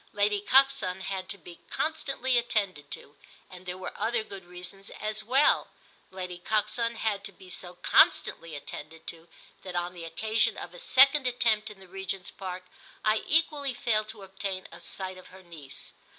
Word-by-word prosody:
Lady 205 0 +3
Coxon 265 -6 +4
had 190 0 -4
to - - -3
be 175 -1 -12
constantly 275 -5 0
attended 200 -11 +1
to, 145 - -7 0.4
and 185 0 -11
there 180 0 -3
were 185 - -6
other 225 +2 +1
good 195 -4 -9
reasons 180 +2 -6
as 215 0 0
well. 265 +6 +4 0.4
Lady 180 -2 -6
Coxon 225 +4 +1
had 215 -3 -1
to 200 - -2
be 185 -1 -13
so 180 0 -6
constantly 165 -2 +4
attended 155 +2 -8
to 165 0 -7 0.3
that 185 -2 -7
on 175 0 -1
the 175 -2 -8
occasion 220 +6 +1
of - - -7
a - - -9
second 275 - +6
attempt 225 -3 +2
in 210 -2 -12
the 190 - -13
Regent's 190 0 -4
Park 185 -1 -6 0.4
I 215 0 +4
equally 295 -4 +2
failed 215 -4 +1
to 215 -2 -8
obtain 195 0 -4
a - - -10
sight 185 -1 -3
of 185 - -14
her 190 0 -14
niece. 160 -6 -7
195 Hz, 175 wpm, -29 LUFS, 180-225 Hz, 0.4 s, second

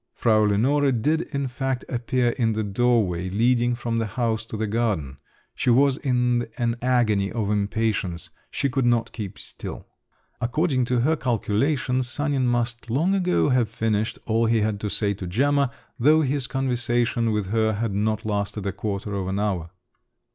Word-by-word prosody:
Frau 110 -2 +3
Lenore 135 +8 +2
did 150 +7 +1
in 140 -1 -1
fact 130 0 -3
appear 125 0 0
in 115 -2 0
the 110 0 -1
doorway 100 -4 +1
leading 120 +4 +2
from 115 -1 -2
the 115 - -1
house 115 0 -2
to 110 - -5
the 110 - -1
garden. 100 - -1 0.4
She - - -1
was 135 +2 +4
in 125 -2 +1
an 115 -1 0
agony 115 -6 +2
of 110 -3 -1
impatience; 100 -4 -1 0.2
she 140 - -1
could 130 -1 0
not 120 -1 +1
keep 105 -5 -6
still. - - -8 0.6
According 130 +1 +1
to 125 0 +1
her 155 +6 +2
calculations, 125 +1 0
Sanin 140 -2 0
must 120 0 -1
long 160 +11 +2
ago 180 -5 +2
have 125 -4 +2
finished 110 0 -1
all 115 0 +2
he 115 -1 +2
had 105 -1 0
to 105 - -3
say 100 0 0
to 95 -2 -7
Gemma, 140 +8 +2 0.3
though 155 +6 +5
his 140 -2 0
conversation 120 -3 0
with 105 -3 -1
her 110 -1 +2
had 110 0 -2
not 110 +2 -1
lasted 105 -1 -2
a 100 - 0
quarter 100 +1 -4
of 95 -2 -2
an 95 +1 -2
hour. 95 -5 -1
115 Hz, 170 wpm, -24 LUFS, 105-130 Hz, 0.6 s, though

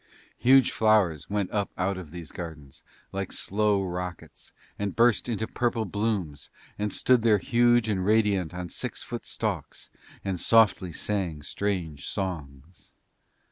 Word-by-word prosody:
Huge 130 0 +5
flowers 100 -9 +2
went 100 -2 -1
up 105 -2 -1
out 95 +2 0
of 90 -4 -8
these 85 -1 -8
gardens 75 -6 -9 0.3
like 95 -1 -4
slow 105 -1 +1
rockets 90 -1 -6 0.3
and 100 -2 -2
burst 120 0 +3
into 110 -1 -1
purple 115 -1 -1
blooms 100 -7 -2 0.3
and 105 0 -1
stood 125 +3 +3
there 110 -2 +4
huge 120 0 +3
and 100 -4 0
radiant 100 -4 +2
on 90 0 -5
six - - -5
foot - - -7
stalks - - -4 0.3
and 95 -2 -2
softly 105 -5 +4
sang 85 -4 -2
strange 85 -5 -3
songs. 80 -4 -6
100 Hz, 140 wpm, -27 LUFS, 90-110 Hz, 0.3 s, Huge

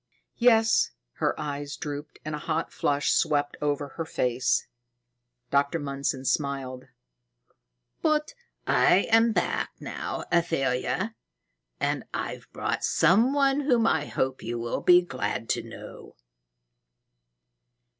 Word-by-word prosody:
"Yes." 225 -2 +4 0.3
Her - - 0
eyes 145 -1 -4
drooped 145 0 -6
and 155 - -4
a 150 - -3
hot 155 +1 -2
flush 145 0 +1
swept 145 -1 +1
over 145 -1 -1
her 165 - -1
face. 125 -5 0 0.9
Dr. 140 +3 +2
Mundson 140 -2 -3
smiled. 130 -1 -1 1.2
"But 305 +4 +1 0.3
I'm 225 +5 +4
back - - -1
now, - - -5
Athalia, 165 - 0 0.7
and - - 0
I've - - -5
brought - - -2
some 200 - +4
one 275 0 +3
whom 250 -6 +2
I 160 -8 +1
hope 130 0 -2
you 120 +1 -4
will 115 0 -3
be 180 0 +6
glad 130 -7 -3
to - - +1
know." - - -11
150 Hz, 115 wpm, -27 LUFS, 140-220 Hz, 1.2 s, be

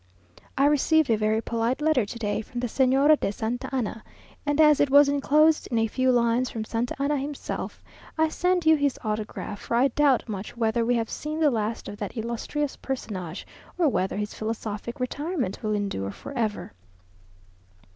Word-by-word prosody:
I 275 - +4
received 295 -1 +3
a - - +5
very 215 +1 +1
polite 230 +3 -1
letter 300 -8 +2
today 215 -2 -2
from 240 +3 -7
the - - -1
Señora 270 +5 +4
de - - -1
Santa 225 +4 -3
Anna, 235 -4 -3 0.4
and 290 +1 +1
as 300 -2 +6
it 285 - +3
was 285 +1 +7
enclosed 300 +3 +3
in 235 - 0
a 225 - +3
few 255 +4 +1
lines 240 +1 +2
from 220 -1 -5
Santa 230 +2 -2
Anna 285 +1 +1
himself, 280 +1 -5 0.3
I 320 0 +4
send 360 +2 0
you 315 0 +7
his 285 -3 0
autograph, 210 -1 -4
for - - -2
I 255 +4 +4
doubt 275 -1 +2
much 210 +1 -6
whether 230 0 +1
we 245 +1 +2
have 230 -1 -2
seen 305 +1 -4
the 305 -3 +4
last 220 -1 -2
of 205 - -7
that 205 +2 -6
illustrious 235 +6 -3
personage, 190 -10 -5 0.3
or 335 -4 +3
whether 190 -5 -1
his 210 0 -3
philosophic 220 +1 -5
retirement 280 - -3
will 215 -1 -1
endure 195 - -2
for 100 - -9
ever. 220 -5 -2
245 Hz, 180 wpm, -26 LUFS, 220-285 Hz, 0.4 s, was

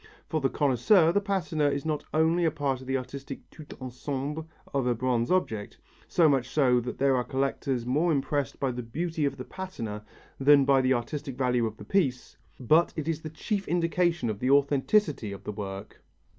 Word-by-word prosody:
For 155 -2 -1
the 135 - +2
connoisseur, 160 - +4
the 205 - +2
patina 175 -7 0
is 140 +1 -3
not 155 -2 -1
only 160 +2 +2
a 165 - +4
part 140 -3 -2
of 130 - -11
the 135 0 +1
artistic 135 +2 -8
tout 155 -2 -12
ensemble 140 +4 -4 0.3
of 135 -3 0
a 120 - +2
bronze 120 -1 0
object 110 - -1 0.3
so 170 -3 +4
much 135 -4 +1
so 130 -4 +3
that 125 +1 -5
there 135 0 +3
are 125 - +1
collectors 135 -2 -2
more 150 +8 +2
impressed 145 -1 -1
by 135 -2 0
the 125 0 -4
beauty 160 +6 -2
of 140 -1 -2
the 130 - -7
patina 115 - -6 0.4
than 140 0 +6
by 135 -1 +4
the 130 0 +3
artistic 135 +2 -4
value 125 -3 +1
of 110 0 -8
the - - -10
piece 135 -11 0 0.2
but 155 +7 +3
it 155 -1 -4
is 165 -1 -1
the 155 - -6
chief 195 +6 -3
indication 170 -4 +1
of 105 -2 -3
the 125 - 0
authenticity 140 - +2
of 100 - -8
the - - -4
work. 100 -1 -7
140 Hz, 200 wpm, -28 LUFS, 125-160 Hz, 0.4 s, than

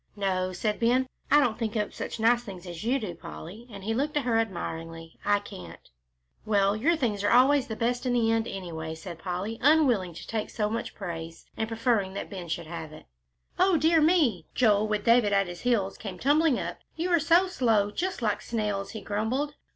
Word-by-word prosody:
"No," 185 -2 0
said 210 +4 -2
Ben, 245 +3 +3 0.2
"I 295 - +7
don't 245 -6 +1
think 225 -1 -2
up 210 -1 -1
such - - -5
nice 235 +2 +4
things 190 -5 -9
as 175 0 -7
you 245 +4 +2
do, 210 -9 -4
Polly," 185 +7 -10
and 200 -3 -10
he 220 +3 -1
looked 290 +5 -1
at 290 - +1
her 230 -2 +2
admiringly; 165 -5 -5
"I 205 0 +3
can't." 90 - -11 0.5
"Well, 200 -1 +2
your 300 +11 +2
things 220 -9 -1
are 205 - +3
always 260 +2 +5
best 240 +3 -1
in 245 - +1
the 230 -2 +2
end, 225 0 +1
anyway," 160 -5 -5
said 165 +1 -9
Polly, 185 +6 -4
unwilling 250 - +3
to - - -9
take 220 -2 -3
so 210 -2 -1
much 230 - -4
praise, 165 -3 -7
and 220 - -2
preferring 225 -4 0
that 200 - -5
Ben 185 -3 -6
should 165 +1 -3
have 160 -1 -7
it. 155 - -13 0.5
"O 370 -1 +4
dear 320 +2 +4
me!" 300 - +3
Joel, 215 -3 +3
with 210 -1 -1
David 230 -3 +4
at 195 0 +3
his 175 -1 -8
heels, 220 -6 0
came 190 -4 -6
tumbling 290 - +3
up. - - -5 0.2
"You 345 +3 -2
are 340 - +5
so 335 +4 +4
slow, 225 - +2
just 370 - -3
like 210 -1 0
snails," 210 -3 -2
he 220 - -6
grumbled. 240 +8 -1
215 Hz, 205 wpm, -27 LUFS, 190-245 Hz, 0.5 s, I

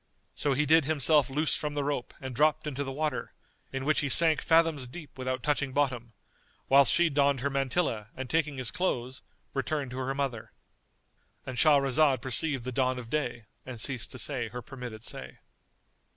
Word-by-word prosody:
So 145 - 0
he 150 +3 +1
did 160 0 +5
himself 150 -1 +3
loose 150 +3 +1
from 150 -1 -3
the 145 - 0
rope 140 -3 -3
and 130 -1 -6
dropped 150 +4 +2
into 140 -2 -3
the 135 - -5
water, 150 +2 -3 0.4
in 135 0 -4
which 155 +1 +2
he 140 - -1
sank 160 +1 +5
fathoms 160 -5 +2
deep 145 +3 -10
without 130 -1 -3
touching 140 -2 0
bottom; 125 -5 -1 0.5
whilst 140 0 +6
she 170 0 +4
donned 140 -3 +2
her 140 +2 -1
mantilla 135 -5 -1
and 130 0 -5
taking 150 -1 0
his 130 -2 -3
clothes, 130 -8 -2 0.3
returned 135 0 -2
to 125 - -6
her 130 +1 -2
mother— 135 -5 -3 0.9
And 130 - -5
Shahrazad 140 -1 +4
perceived 135 +2 -2
the 130 - -4
dawn 130 0 0
of 120 -2 -8
day 120 -7 -2 0.2
and 125 -3 -8
ceased 130 0 -1
to - - -7
say 125 -3 -2
her 120 +2 -7
permitted 125 -6 -8
say. 65 - -8
135 Hz, 180 wpm, -29 LUFS, 125-150 Hz, 0.9 s, whilst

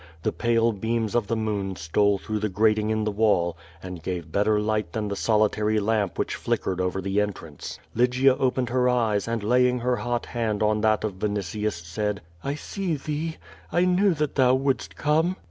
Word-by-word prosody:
The - - +1
pale 115 -1 +2
beams 110 +1 -2
of 120 -4 +1
the 115 - 0
moon 105 -3 -2
stole 100 +5 +2
through 110 +2 -3
the 105 0 -1
grating 105 +2 +2
in 110 0 0
the 105 - 0
wall 100 -5 +2 0.3
and 90 -2 -7
gave 85 -1 -4
better 105 +1 +2
light 105 -4 -1
than 105 -2 -2
the 100 - -2
solitary 105 +1 +2
lamp 105 -2 0
which - - -1
flick - - -1
ered 95 -1 -2
over 90 +1 -1
the 100 +2 +1
entrance. 85 -8 -5 0.2
Lygia 125 +3 +3
opened 130 -1 0
her 125 +1 +2
eyes 115 -5 +1
and 115 -2 -2
laying 125 +3 +3
her 125 0 +1
hot 120 -1 -2
hand 110 -3 -1
on 105 0 +2
that 110 0 +2
of 100 -4 -3
Vinitius, 105 -2 -2
said: 105 +4 -2 0.2
"I 140 +1 -2
see 180 +2 -3
thee. 155 +3 -4 0.3
I 175 +1 +3
knew 185 0 +3
that 150 -1 -1
thou 130 -2 +4
wouldst 135 0 -1
come. 160 +5 +1
110 Hz, 195 wpm, -25 LUFS, 100-125 Hz, 0.3 s, thou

